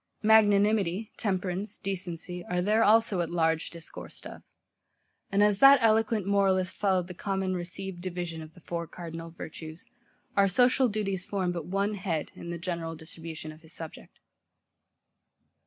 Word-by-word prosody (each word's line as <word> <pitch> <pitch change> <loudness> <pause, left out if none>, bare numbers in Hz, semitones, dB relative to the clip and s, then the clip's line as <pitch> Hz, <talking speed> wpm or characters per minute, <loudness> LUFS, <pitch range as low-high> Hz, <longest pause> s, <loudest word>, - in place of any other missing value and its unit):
MAGNANIMITY, 210 -2 +4
TEMPERANCE, 190 -1 -2
DECENCY, 180 -2 -4
are 180 0 0
there 215 +3 +3
also 215 -3 +4
at 170 - -2
large 165 -1 +1
discoursed 170 -1 -9
of. - - -9 0.9
And 200 +1 +4
as 205 -1 +3
that 275 +1 +9
eloquent 220 -2 +3
moralist 195 -2 +2
followed 190 -3 +1
the 180 - -7
common 190 0 -2
received 180 +1 -5
division 175 -3 -4
of 155 +1 -11
the 175 - -16
four 170 0 -4
cardinal 165 -1 -7
virtues, 160 0 -9 0.5
our 200 0 +5
social 250 +6 +4
duties 200 -4 -2
form 185 -2 -1
but 170 -3 -5
one 200 +3 0
head, 180 -6 -3
in 170 - -9
the 170 - -3
general 170 -1 -4
distribution 160 -1 -8
of 155 +1 -14
his 160 0 -9
subject. 160 -1 -9
185 Hz, 150 wpm, -28 LUFS, 170-200 Hz, 0.9 s, that